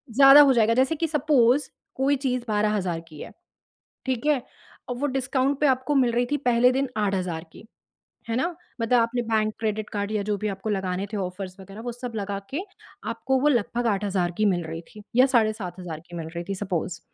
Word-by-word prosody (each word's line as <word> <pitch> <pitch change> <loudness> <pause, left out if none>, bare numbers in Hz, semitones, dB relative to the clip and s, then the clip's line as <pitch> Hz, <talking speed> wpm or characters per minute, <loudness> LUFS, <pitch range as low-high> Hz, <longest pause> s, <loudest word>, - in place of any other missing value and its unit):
ज़्यादा 275 +1 +9
हो 275 -2 +6
जाएगा, 230 -1 +3
जैसे 265 +6 +2
कि 330 +2 -1
सपोज़ 285 -3 +3 0.3
कोई 275 +2 +2
चीज़ 255 -2 -1
12,000 210 -5 0
की 155 -2 -13
है, - - -8 0.7
ठीक 260 +1 -2
है। 295 -4 +3 0.5
और 245 - -2
वो 285 - -1
डिस्काउंट 265 +1 0
पे 295 - +3
आपको 260 +2 +1
मिल 250 -3 +4
रही 245 +1 +1
थी 290 - +2
पहले 245 +1 +5
दिन 270 0 0
8000 185 -5 -1
की - - -14 0.6
है 225 - 0
ना, 260 - +1 0.4
मतलब 235 +1 +3
आपने 235 +1 0
बैंक, 215 -2 0
क्रेडिट 215 -1 -2
कार्ड 205 0 -3
या 210 -1 0
जो 205 - +1
भी 215 - -3
आपको 195 +2 -4
लगाने 190 -1 -1
थे 210 - -3
ऑफर्स 185 0 -5
वगैरह 195 +3 -10
वो 240 0 -4
सब 245 0 -6
लगा 200 -1 -3
के 290 +6 -3 0.5
आपको 265 0 0
वो 295 - +2
लगभग 240 -2 +1
8000 195 -4 0
की 215 - +2
मिल 175 -4 +2
रही 165 +1 -6
थी 210 - -10
या 255 +1 +7
साढ़े 215 -2 +4
7000 180 -5 -7
की 175 - -10
मिल 165 -1 -5
रही 170 - -3
थी 195 - -1
सपोज़ 180 -3 -3
225 Hz, 210 wpm, -25 LUFS, 195-260 Hz, 0.7 s, ज़्यादा